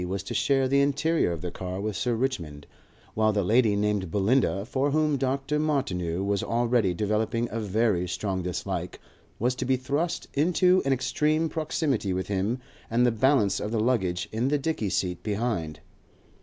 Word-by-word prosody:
was 95 +1 -3
to - - -5
share 135 -1 +2
the 140 +1 +3
interior 145 - +1
of 85 -2 -4
the 90 - -3
car 90 +1 -5
with 105 0 -3
Sir 120 -2 0
Richmond, 85 - -3 0.5
while 110 0 +2
the 105 -1 0
lady 110 +1 +3
named 100 -3 0
Belinda, 100 +1 +1
for 135 +4 0
whom 155 0 +2
Dr. 135 +2 -1
Martineau 95 - -1
was 100 0 0
already 115 -5 +1
developing 110 +4 0
a 115 - -2
very 105 -3 +1
strong 95 +1 -2
dislike, 90 -1 -4 0.4
was 125 +3 +1
to 125 - -4
be 130 0 +1
thrust 145 +7 -2
into 180 +5 +3
an 135 - +1
extreme 150 +5 +1
proximity 145 - -1
with 95 0 -3
him 100 +5 0 0.3
and 120 +2 +3
the 120 - +4
balance 115 -3 +2
of 105 - -3
the 115 0 -1
luggage 100 -7 0
in 115 +4 0
the 145 +2 +2
dicky 140 -8 -2
seat 90 -1 -1
behind. 105 -8 -2
115 Hz, 175 wpm, -26 LUFS, 95-135 Hz, 0.5 s, the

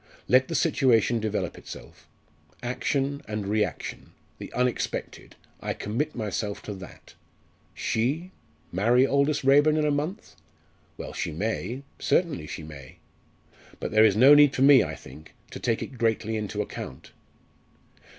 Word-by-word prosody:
Let 130 +1 +4
the - - -4
situation 120 -7 +3
develop 105 -4 -3
itself. - - -12 0.6
Action 135 +3 -1
and 105 -1 -3
reaction 105 +1 -3 0.3
the - - -8
unexpected 125 0 -2 0.2
I - - -3
commit 135 +9 -3
myself 105 -2 -3
to 105 - -5
that. 95 -2 -12 0.6
She 145 +11 -1 0.4
marry 120 +8 +3
Aldous 140 +1 +1
Raeburn 145 +3 +5
in 155 - +1
a 150 - +2
month? 155 +9 -3 0.6
Well, - - -7
she - - -3
may 115 - -3 0.2
certainly 150 - 0
she 80 - -7
may. 70 -4 -11 0.8
But - - -4
there 110 0 +5
is 105 -3 +5
no 130 +6 +8
need 145 -1 +6
for 130 - +2
me, 140 -2 +8
I - - -5
think, 80 - -14 0.2
to - - -7
take 115 -2 0
it 130 - -10
greatly 110 -1 0
into 105 -1 -2
account. - - -9
120 Hz, 140 wpm, -26 LUFS, 105-140 Hz, 0.8 s, no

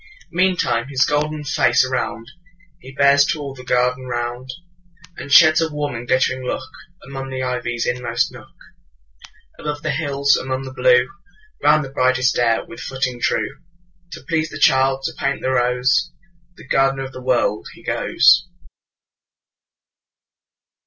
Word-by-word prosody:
Meantime 170 -10 +1
his 130 -2 +2
golden 150 +1 -1
face 130 -4 +2
aroundHe 120 -3 -3 0.7
bears 140 0 +5
to 155 +2 -1
all 140 -2 -6
the 130 -1 -12
garden 125 +1 0
ground, 120 +1 -4 0.7
And 140 - -9
sheds 155 +2 +7
a 160 -1 -1
warm 150 -1 -3
and 120 +1 -7
glittering 130 0 +1
lookAmong 135 +1 -8
the 130 -1 -4
ivy's 125 -2 -2
inmost 125 0 -1
nook. - - -13 1.1
Above 150 0 -5
the 155 - -1
hills, 140 0 +1
along 130 0 -3
the 130 -1 -8
blue, 125 -1 +3 0.5
Round 150 0 +3
the - - -9
bright 130 -1 +1 0.2
air 115 -2 +1
with 170 - -12
footing 130 -2 -4
true, 140 +3 -1 0.5
To 165 - -10
please 160 -2 0
the - - -8
child, 135 0 +3
to - - -3
paint 140 - -2
the 130 - 0
rose, 130 +5 +1 0.5
The - - -14
gardener 135 0 +1
of 135 - -8
the 130 - -10
World, 120 -4 0
he - - -17
goes. 170 +6 +3
130 Hz, 145 wpm, -20 LUFS, 125-145 Hz, 1.1 s, sheds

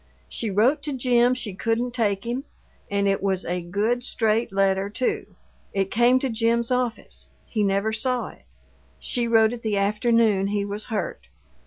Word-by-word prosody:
She 225 - -3
wrote 225 +10 +3
to 295 - -4
Jim 245 -1 +3
she 225 -6 -5
couldn't 230 +4 -1
take 205 -5 0
him, 240 +3 -3 0.5
and 200 0 +1
it 195 0 +1
was 190 -1 0
a 180 +1 -2
good, 210 +8 -1
straight 225 -2 0
letter, 195 0 +1
too. 250 +4 -2 0.4
It 195 -1 -1
came 240 +3 +4
to 270 - 0
Jim's 230 +1 +1
office; 250 -2 -2 0.2
he 220 - -2
never 200 +2 +1
saw 245 0 0
it. - - -17 0.5
She 240 -1 -1
wrote 225 0 +4
it 240 - -7
the 215 -3 -1
afternoon 210 0 +2
he 200 0 -1
was 205 +1 -5
hurt." 190 - -4
220 Hz, 170 wpm, -24 LUFS, 200-240 Hz, 0.5 s, came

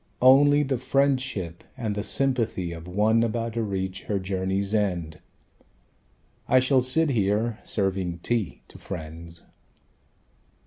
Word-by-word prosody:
Only 145 +3 +6
the 135 -3 -1
friendship 130 -9 0
and 110 -5 -2
the 105 - -2
sympathy 115 -9 0
Of 85 0 -8
one 105 +5 +2
about 115 0 -1
to 115 - -1
reach 95 -3 -3
her 105 - -1
journey's 95 +1 -2
end. 90 -7 -1 1.3
I 130 - +4
shall 130 0 +3
sit 150 +5 +2
here, 110 +1 0
serving 95 -4 -1
tea 115 -5 -1
to - - -14
friends...." 85 -1 -8
105 Hz, 125 wpm, -25 LUFS, 95-130 Hz, 1.3 s, Only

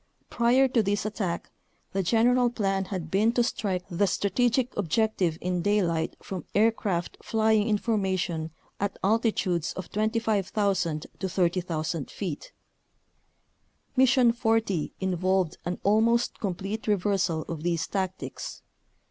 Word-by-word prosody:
Prior 245 +3 +4
to 245 -3 +2
this 205 0 -1
attack 195 -5 -3 0.4
the 195 - +1
general 240 +6 +3
plan 195 -4 -1
had 180 -4 -5
been 210 +4 +3
to 245 - +3
strike 195 -7 -2
the 195 +2 +1
strategic 245 +6 +1
objective 195 -3 +1
in 180 -1 -1
daylight 170 -5 +1
from 185 -4 -5
aircraft 205 -5 +1
flying 220 -1 +2
in 210 - +3
formation 190 -7 -1 0.3
at 200 0 -2
altitudes 195 -5 +1
of 185 - -7
25,000 200 -6 0
to 190 - -2
30,000 170 -4 -1
feet. 175 -8 -5 1.4
Mission 255 -2 +5
40 225 -7 0
involved 185 -1 0
an 175 +1 -2
almost 230 +3 +2
complete 200 +2 -4
reversal 190 -5 +1
of 165 -3 -6
these 170 -1 0
tactics. 190 -1 -4
195 Hz, 120 wpm, -27 LUFS, 180-220 Hz, 1.4 s, Mission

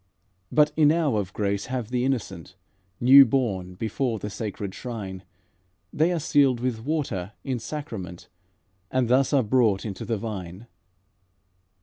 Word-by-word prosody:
"But 150 0 +4
enow 155 -3 +3
of 100 -2 -2
grace 100 -1 -2
have 125 -3 -4
the 125 -1 0
innocent 100 -10 -3 0.4
New 135 +3 +9
born, 105 -8 -1
before 115 +4 -2
the 105 0 -6
sacred 100 -3 -5
shrine, 100 -7 -6 0.7
They 160 +4 +2
are 175 - 0
sealed 140 -5 +3
with 120 -3 -2
water 125 - -2
in 130 -3 -2
sacrament, 110 - -7 0.6
And 130 -2 0
thus 130 +1 +3
are 140 -3 +3
brought 110 -3 +2
into 100 -3 -5
the 115 - -2
vine. 100 -2 -6
115 Hz, 135 wpm, -25 LUFS, 100-135 Hz, 0.7 s, New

